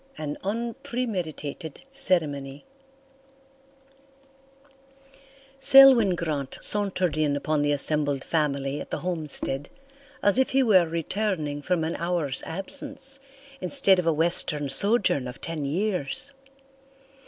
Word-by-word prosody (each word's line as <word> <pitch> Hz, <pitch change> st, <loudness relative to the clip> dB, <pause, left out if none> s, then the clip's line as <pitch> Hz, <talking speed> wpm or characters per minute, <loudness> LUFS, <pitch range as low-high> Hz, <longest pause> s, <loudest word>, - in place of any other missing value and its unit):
An 150 Hz, -1 st, -6 dB
Unpremeditated 205 Hz, -, -6 dB
CeremonyToC 150 Hz, -, -1 dB, 3.0 s
Selwyn 265 Hz, -8 st, +6 dB
Grant 150 Hz, -6 st, -5 dB
sauntered 185 Hz, -6 st, +3 dB
in 150 Hz, -2 st, 0 dB
upon 150 Hz, +1 st, -2 dB
the 145 Hz, 0 st, 0 dB
assembled 145 Hz, -1 st, +1 dB
family 140 Hz, -3 st, -2 dB
at -, -, -10 dB
the -, -, -5 dB
homestead 155 Hz, -5 st, -4 dB, 0.5 s
as 205 Hz, +5 st, +4 dB
if 265 Hz, -, +1 dB
he 270 Hz, 0 st, +1 dB
were 190 Hz, -8 st, +3 dB
returning 165 Hz, -3 st, -4 dB
from 175 Hz, +1 st, -2 dB
an 160 Hz, +1 st, -4 dB
hour's 170 Hz, -6 st, -1 dB
absence 270 Hz, -, 0 dB, 0.4 s
instead 190 Hz, -2 st, +6 dB
of 175 Hz, -, -3 dB
a -, -, +3 dB
western 155 Hz, -2 st, 0 dB
sojourn 185 Hz, -, +1 dB
of 125 Hz, +1 st, -10 dB
ten 160 Hz, -3 st, -6 dB
years. 195 Hz, -, -3 dB
170 Hz, 110 wpm, -24 LUFS, 145-210 Hz, 3.0 s, Selwyn